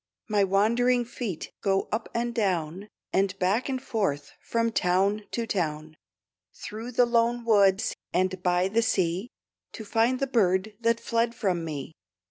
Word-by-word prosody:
My 210 -3 +2
wandering 235 +6 +2
feet 225 -8 -5
go 195 -1 +1
up 220 +1 -2
and 235 0 -1
down, 190 -4 -1 0.3
And 195 0 +1
back 200 +8 +1
and 260 -1 -1
forth, 195 - -2
from 230 0 0
town 195 +2 +1
to 235 - -2
town, 155 -6 -3 0.6
Through 225 +4 -7
the 245 +1 +5
lone 235 0 +1
woods 200 -3 +3 0.2
and 185 0 0
by 180 0 +2
the 220 +4 +1
sea, 190 -1 0 0.4
To 220 - -8
find 230 +4 +1
the 275 - +1
bird 210 -5 +1
that 230 0 +2
fled 230 0 0
from 180 -6 -1
me. 155 -1 -5
210 Hz, 150 wpm, -27 LUFS, 185-230 Hz, 0.6 s, the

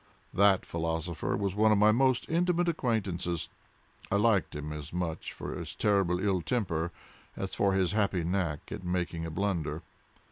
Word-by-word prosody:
That 100 -1 +4
philosopher 80 0 -2
was 100 -2 -1
one 110 +2 +4
of 105 - +5
my 105 +1 +6
most 130 +2 +2
intimate 175 +1 +2
acquaintances. 100 - -1 0.6
I - - +3
liked 105 -5 +2
him 75 +1 -4
as 75 0 -7
much 85 -2 -3
for - - -6
his - - -6
terrible 95 -4 +2
ill 95 -2 +1
temper, 85 -5 -1 0.5
as - - -4
for 100 -1 +2
his 95 -2 +2
happy 100 -4 +1
knack 85 -4 -2
at 105 -3 -5
making 90 -2 -2
a - - -4
blunder. 85 -3 -2
95 Hz, 165 wpm, -30 LUFS, 85-105 Hz, 0.6 s, my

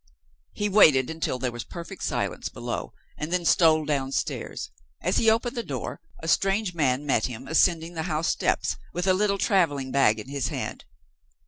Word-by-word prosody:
He 205 - -1
waited 155 -10 +5
until 160 -5 -2
there 125 -1 -2
was 120 -1 -6
perfect 170 -2 -9
silence - - -2
below, - - -5 0.3
and 150 +2 -4
then 180 -1 0
stole 160 -2 +4
downstairs. 135 -2 -2 0.3
As 180 - 0
he 225 - +4
opened 235 +3 +1
the 235 - -1
door, - - -5 0.2
a - - -4
strange 195 +3 +1
man 145 -3 +1
met 125 -6 +2
him, 125 +1 -8
ascending 165 +1 +2
the 160 - -3
house 155 +1 0
steps, - - 0 0.2
with 175 +1 -2
a 190 - +4
little 200 +1 +1
traveling 160 - +1
bag 125 -5 +4
in 105 - -8
his 140 -1 -2
hand. - - -5
160 Hz, 180 wpm, -26 LUFS, 135-185 Hz, 0.3 s, waited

